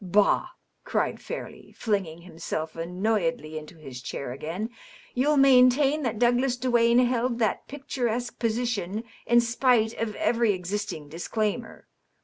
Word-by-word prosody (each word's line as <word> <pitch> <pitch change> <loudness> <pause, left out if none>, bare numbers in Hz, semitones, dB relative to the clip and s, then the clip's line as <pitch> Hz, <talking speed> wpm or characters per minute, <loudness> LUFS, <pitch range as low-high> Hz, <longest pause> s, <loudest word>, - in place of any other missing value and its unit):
" - - -11
Bah 205 - +4 0.2
!" - - -49
cried - - -1
Fairleigh, - - -8
flinging 190 -7 -2
himself 160 -2 -5
annoyedly 185 +2 -1
into 155 +3 -13
his 135 -5 -9
chair 125 0 -5
again. 165 - -4
^^ - - -27 0.4
You'll 290 +4 +2
maintain 270 +2 +5
that 235 -5 -2
Douglas 245 +2 +2
Duane 240 -1 +3
hdd 245 -1 +2
that 220 -4 0
picturesque 245 -4 -3
position, 225 -3 -1 0.2
in 240 0 +6
spite 235 -1 +2
of 220 -2 -2
every 230 -3 +2
existing 185 -3 -4
disclaimer. 215 +8 -3
230 Hz, 135 wpm, -26 LUFS, 185-245 Hz, 0.4 s, in